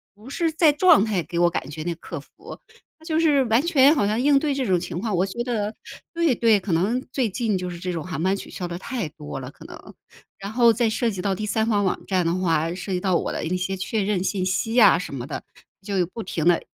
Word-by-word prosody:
不 215 +5 -13
是 330 +4 0
在 320 -2 +5
状 295 - +5
态 205 -5 0
给 170 +1 -6
我 175 0 +4
感 150 -5 -4
觉 155 +1 -6
那 175 - -2
个 - - -15
客 - - -7
服， - - -13 0.4
他 320 - -22
就 320 -1 0
是 295 -4 +4
完 225 +1 +3
全 290 -3 +5
好 210 -10 +1
像 215 +3 0
应 280 0 +4
对 295 -2 0
这 265 - -1
种 185 -5 +2
情 170 - -5
况， 220 -2 -2
我 185 - +2
觉 235 +5 -4
得 220 -3 -2 0.4
对 335 -5 +2
对， 225 -3 +3
可 185 - -4
能 205 +10 +1
最 255 -4 0
近 215 0 -1
就 180 0 -4
是 175 - -7
这 180 +1 -4
种 165 -3 -4
航 180 -5 -4
班 190 +2 +2
取 - - -9
消 180 - -5
得 170 - -4
太 235 -6 -4
多 150 -2 -8
了， 125 +1 -8
可 - - -16
能。 - - -12 0.5
然 200 +2 -6
后 235 0 +5
再 230 +1 +1
涉 235 +2 0
及 190 - -7
到 195 0 0
第 215 - -4
三 220 +1 +1
方 205 -3 +2
网 190 - -2
站 185 -3 0
的 165 - +1
话， 165 -3 0
涉 190 +1 -5
及 180 - 0
到 185 -3 +1
我 - - -3
的 - - -3
一 180 +3 -1
些 190 +1 -2
确 205 +3 -2
认 195 -2 0
信 190 -1 -1
息 190 +4 -1
呀 225 -8 +7
什 180 - -6
么 125 -2 -5
的， 145 - -6 0.4
就 195 -3 0
不 225 +6 -7
停 165 -3 -3
地 175 - +4
200 Hz, 290 characters per minute, -23 LUFS, 180-240 Hz, 0.5 s, 呀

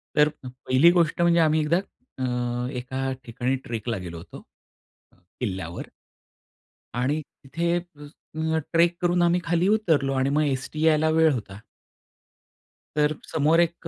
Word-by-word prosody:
तर 150 0 +5 0.2
1ली 130 +5 +3
गोष्ट 170 -1 +1
म्हणजे 170 0 +4
आम्ही 155 -1 +3
एकदा 155 +3 +2 0.4
अ, 125 -1 -2
एका 130 +1 -3
ठिकाणी 125 +2 -2
ट्रेकला 115 -1 -3
गेलो 85 -3 -7
होतो. 80 - -11 1.0
किल्ल्यावर 95 -7 -4 1.1
आणि 145 +5 0 0.2
तिथे, 170 +5 -2
अ, 170 -4 -9 0.5
ल 160 - +2 0.2
ट्रेक 170 +1 +4
करून 175 0 +2
आम्ही 175 +1 +3
खाली 175 +2 +1
उतरलो, 165 -11 +2
आणि 135 0 +1
मग 150 +2 +2
एसटी 145 +3 -2
यायला 155 0 +4
वेळ 160 0 +4
होता. 105 -5 -6 1.4
तर 150 0 +2 0.2
समोर 160 +2 +3
1 170 0 -2
150 Hz, 135 wpm, -25 LUFS, 125-165 Hz, 1.4 s, तर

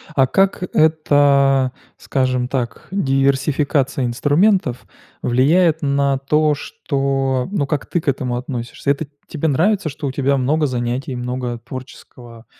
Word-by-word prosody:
А 135 -2 +4
как 195 +2 +1
эта, 140 -4 +3 0.3
скажем 130 -2 -1
так, 125 -3 -4
диверсификация 140 -3 +1
инструментов 145 - +1 0.4
влияет 160 +7 +3
на 140 -1 +1
то, 150 +2 +1
что, 135 -3 -2
ну, 175 -9 0
как 145 -1 -2
ты 175 - -2
к - - -20
этому 125 -2 -1
относишься? 125 +2 -3
Это 145 +1 -2 0.2
тебе 160 0 -2
нравится, 175 +4 +1
что 145 0 -5
у - - -2
тебя 140 0 +1
много 150 +4 +1
занятий, 125 +1 -3
много 125 0 -3
творческого, 120 -2 -11
135 Hz, 130 wpm, -19 LUFS, 130-150 Hz, 0.4 s, А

